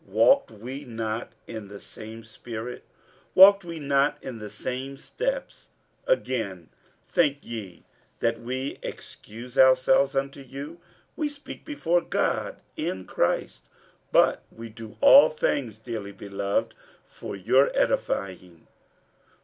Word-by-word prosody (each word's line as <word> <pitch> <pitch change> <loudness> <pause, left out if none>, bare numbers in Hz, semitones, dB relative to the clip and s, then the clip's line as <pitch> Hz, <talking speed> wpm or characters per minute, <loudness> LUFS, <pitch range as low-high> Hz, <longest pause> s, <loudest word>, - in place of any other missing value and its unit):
walked 275 0 +4
we 125 +6 -8
not 115 -3 -4
in 110 -3 -7
the 100 0 -10
same 110 +1 -9
spirit? 115 +1 -7 0.5
walked 200 +1 +9
we 170 -1 -6
not 140 -1 +2
in 125 -4 -6
the 105 -1 -7
same 130 +6 -5
steps? - - -4 0.4
47:012:019 - - +5
Again, 100 -9 -4 0.4
think 150 -5 +2
ye 105 -7 -8 0.3
that 115 0 0
we 130 +3 -4
excuse 120 +4 -7
ourselves 130 +1 +5
unto 140 +1 -2
you? 140 +5 -8 0.4
we 305 -2 -1
speak 290 0 -9
before 175 - +1
God - - -1 0.2
in 95 0 -3
Christ: - - -1 0.4
but - - +4
we 115 0 -9
do 110 -1 -11
all 280 0 +9
things, 135 -7 -1
dearly 110 -3 -6
beloved, 100 0 -2 0.3
for - - -8
your 125 +8 +4
edifying. 90 -3 -1
125 Hz, 125 wpm, -26 LUFS, 110-140 Hz, 0.5 s, walked